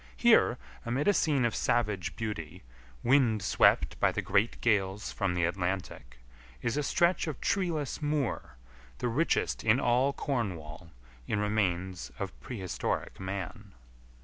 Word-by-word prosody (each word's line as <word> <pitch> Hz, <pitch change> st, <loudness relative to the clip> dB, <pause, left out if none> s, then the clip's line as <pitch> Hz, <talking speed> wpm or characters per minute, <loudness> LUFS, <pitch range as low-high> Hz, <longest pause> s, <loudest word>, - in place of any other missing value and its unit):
Here, -, -, +5 dB, 0.3 s
amid 125 Hz, +7 st, -1 dB
a 205 Hz, -, +6 dB
scene 145 Hz, -9 st, +2 dB
of 115 Hz, -, 0 dB
savage 100 Hz, -7 st, 0 dB
beauty, 90 Hz, -6 st, -5 dB, 0.4 s
wind 120 Hz, -6 st, +3 dB
swept -, -, +3 dB
by -, -, +3 dB
the -, -, -3 dB
great 105 Hz, +4 st, +1 dB
gales 100 Hz, -3 st, 0 dB
from 95 Hz, -3 st, -1 dB
the 90 Hz, -, +1 dB
Atlantic, 90 Hz, -8 st, -3 dB, 0.5 s
is 120 Hz, -, 0 dB
a 150 Hz, -, +1 dB
stretch 170 Hz, +5 st, +2 dB
of 150 Hz, -5 st, -4 dB
treeless 165 Hz, -9 st, -1 dB
moor 145 Hz, -, -2 dB, 0.4 s
the 125 Hz, -, -2 dB
richest 150 Hz, +9 st, 0 dB
in 115 Hz, +3 st, +4 dB
all 125 Hz, +3 st, +3 dB
Cornwall 90 Hz, -, -4 dB, 0.4 s
in 110 Hz, -, 0 dB
remains 95 Hz, -, -1 dB
of -, -, -4 dB
prehistoric 95 Hz, -, -4 dB
man. 100 Hz, +2 st, -6 dB
105 Hz, 135 wpm, -30 LUFS, 95-130 Hz, 0.5 s, a